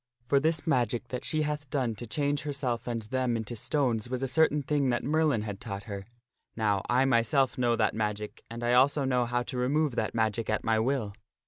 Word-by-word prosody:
For 140 Hz, +3 st, +3 dB
this 160 Hz, +2 st, +1 dB
magic 120 Hz, -5 st, 0 dB
that 125 Hz, 0 st, -4 dB
she 155 Hz, -1 st, 0 dB
hath 150 Hz, -2 st, -3 dB
done 130 Hz, -5 st, 0 dB
to 120 Hz, -, -7 dB
change 145 Hz, +4 st, 0 dB
herself 135 Hz, -5 st, -2 dB
and 115 Hz, -2 st, -2 dB
them 125 Hz, +1 st, 0 dB
into 110 Hz, +1 st, -5 dB
stones 120 Hz, -2 st, 0 dB
was 130 Hz, +1 st, -2 dB
a -, -, +1 dB
certain 150 Hz, +1 st, +3 dB
thing 140 Hz, -1 st, +1 dB
that 120 Hz, -, 0 dB
Merlin 150 Hz, -6 st, +2 dB
had 105 Hz, -2 st, -5 dB
taught 100 Hz, -2 st, -5 dB
her. 100 Hz, -1 st, -7 dB, 0.5 s
Now 105 Hz, -3 st, +1 dB
I 125 Hz, +2 st, +4 dB
myself 130 Hz, +2 st, +2 dB
know 120 Hz, -2 st, +2 dB
that 110 Hz, -3 st, +1 dB
magic, 105 Hz, -1 st, -3 dB
and 115 Hz, +1 st, -6 dB
I 120 Hz, +1 st, +2 dB
also 135 Hz, +3 st, +4 dB
know 125 Hz, -2 st, +1 dB
how 120 Hz, +1 st, 0 dB
to 125 Hz, 0 st, -5 dB
remove 140 Hz, +1 st, +1 dB
that 110 Hz, -, -1 dB
magic 110 Hz, 0 st, 0 dB
at 110 Hz, -, 0 dB
my 110 Hz, 0 st, +2 dB
will. 115 Hz, -3 st, 0 dB
125 Hz, 215 wpm, -29 LUFS, 110-140 Hz, 0.5 s, I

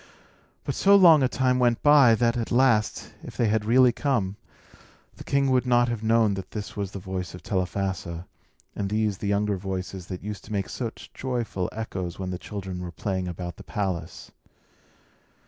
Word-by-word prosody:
But -, -, -2 dB
so 200 Hz, +1 st, +5 dB
long 170 Hz, -6 st, +7 dB
a 130 Hz, -, +4 dB
time 130 Hz, -1 st, +1 dB
went 120 Hz, -2 st, +2 dB
by, 145 Hz, -6 st, +7 dB
that, 115 Hz, +2 st, +1 dB
at 115 Hz, -2 st, -3 dB
last, 120 Hz, -4 st, +2 dB
if -, -, -10 dB
they 115 Hz, -3 st, +2 dB
had 110 Hz, 0 st, 0 dB
really 125 Hz, +2 st, +5 dB
come, 115 Hz, -7 st, -1 dB, 0.8 s
the -, -, -9 dB
king 140 Hz, -1 st, +1 dB
would 130 Hz, 0 st, +2 dB
not 120 Hz, 0 st, +3 dB
have 120 Hz, -3 st, -3 dB
known 110 Hz, -1 st, +3 dB
that 95 Hz, -1 st, -6 dB
this 105 Hz, -2 st, -6 dB
was 100 Hz, -2 st, -3 dB
the 100 Hz, -, -8 dB
voice 90 Hz, -2 st, -5 dB
of 90 Hz, -, -12 dB
Telephassa, 95 Hz, -3 st, -3 dB, 0.5 s
and 100 Hz, -1 st, -2 dB
these 105 Hz, -2 st, 0 dB
the 100 Hz, -, -3 dB
younger 100 Hz, 0 st, +1 dB
voices 95 Hz, -1 st, -5 dB
that 90 Hz, -2 st, -7 dB
used 105 Hz, -1 st, -6 dB
to 110 Hz, -, -12 dB
make 100 Hz, -2 st, -2 dB
such 115 Hz, -3 st, -6 dB
joyful 120 Hz, -8 st, -3 dB
echoes 95 Hz, -5 st, -5 dB
when 95 Hz, -1 st, -4 dB
the 90 Hz, -, -4 dB
children 95 Hz, -3 st, -6 dB
were 90 Hz, -, -5 dB
playing 95 Hz, +2 st, -3 dB
about 85 Hz, -1 st, -6 dB
the -, -, -11 dB
palace. 90 Hz, -5 st, -4 dB
105 Hz, 185 wpm, -25 LUFS, 95-120 Hz, 0.8 s, long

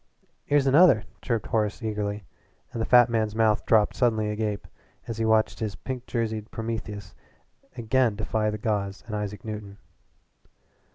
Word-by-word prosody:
"Here's 145 Hz, -1 st, +3 dB
another," 140 Hz, -, +6 dB, 0.2 s
chirped 115 Hz, -3 st, -1 dB
Horace 110 Hz, +1 st, -1 dB
eagerly, 105 Hz, -1 st, -2 dB, 0.5 s
and 115 Hz, -, -3 dB
the -, -, -1 dB
fat 120 Hz, -1 st, +7 dB
man's 110 Hz, -3 st, -1 dB
mouth 110 Hz, -1 st, +2 dB
dropped 110 Hz, -2 st, +4 dB
suddenly 110 Hz, -4 st, +1 dB
agape 105 Hz, -1 st, -3 dB, 0.4 s
as 115 Hz, -1 st, -5 dB
he 115 Hz, -, +1 dB
watched 110 Hz, 0 st, +2 dB
this 110 Hz, -3 st, -3 dB
pink 130 Hz, -2 st, -6 dB
jerseyed 110 Hz, -2 st, -2 dB
Prometheus 110 Hz, -3 st, -5 dB, 0.6 s
again 120 Hz, -1 st, +2 dB
defy 110 Hz, 0 st, -1 dB
the 105 Hz, -, -3 dB
gods 100 Hz, -2 st, -2 dB
and 110 Hz, -2 st, -5 dB
Isaac 105 Hz, -1 st, -5 dB
Newton. 105 Hz, -2 st, -6 dB
110 Hz, 150 wpm, -26 LUFS, 105-115 Hz, 0.6 s, fat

